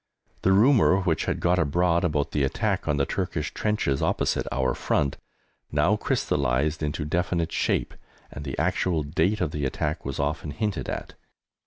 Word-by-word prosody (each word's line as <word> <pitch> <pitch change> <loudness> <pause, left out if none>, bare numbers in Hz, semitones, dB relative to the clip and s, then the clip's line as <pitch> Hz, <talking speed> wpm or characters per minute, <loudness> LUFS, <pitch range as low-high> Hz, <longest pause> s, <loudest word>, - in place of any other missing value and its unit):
The 95 - +3
rumour 105 -2 +5
which 85 -4 0
had - - -1
got 90 +1 +2
abroad 85 +3 +2
about 75 -3 0
the 75 - 0
attack 65 - -1
on 75 - +1
the 70 - +2
Turkish 85 -5 -3
trenches 105 -11 0
opposite - - 0
our 65 -1 +1
front 70 -2 0 0.5
now 75 +8 +3
crystallised 75 -4 0
into 75 0 -2
definite 85 +1 -1
shape, - - 0 0.4
and 75 - -7
the 70 -2 -5
actual 85 -4 +1
date 85 +8 0
of 85 -5 0
the 75 -1 -3
attack 75 +3 -2
was 70 -1 -4
often 75 +2 -1
hinted 105 +7 -2
at. - - -5
80 Hz, 165 wpm, -26 LUFS, 75-90 Hz, 0.5 s, rumour